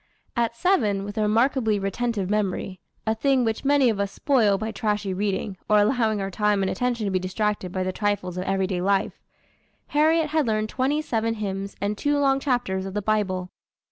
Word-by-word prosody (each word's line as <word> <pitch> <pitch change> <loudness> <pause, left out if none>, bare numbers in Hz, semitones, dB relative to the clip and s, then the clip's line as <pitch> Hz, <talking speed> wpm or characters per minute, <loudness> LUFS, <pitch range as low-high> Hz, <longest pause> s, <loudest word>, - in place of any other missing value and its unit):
At 235 -1 0
seven, 225 - +1
with 205 +1 -6
a - - +2
remarkably 220 +1 +2
retentive 200 0 -2
memory, 195 -2 -1 0.3
a 220 - +2
thing 265 +3 +2
which 225 0 -2
many 280 -1 +4
of 220 -4 +1
us 200 -1 -1
spoil 230 -9 +2
by 220 +3 -3
trashy 210 -4 -1
reading, 195 0 -2
or 210 - +5
allowing 220 0 +2
our 195 0 -3
time 210 0 +1
and 190 - 0
attention 240 0 -1
to 200 - -1
be 185 - +1
distracted 190 0 -2
by 185 0 -2
the 185 0 -2
trifles 205 -3 -1
of 185 0 -3
every 195 0 +1
day 185 -2 -2
life, 195 +1 0 0.7
Harriet 315 +1 +3
had 310 -3 +1
learned 215 -1 0
twenty 275 +6 0
seven 225 -4 -1
hymns 195 -2 -4
and 205 +1 -2
two 290 0 +1
long 275 -1 +3
chapters 240 -9 -1
of 195 - -7
the 210 - 0
Bible. 190 -4 -1
210 Hz, 200 wpm, -24 LUFS, 195-245 Hz, 0.7 s, or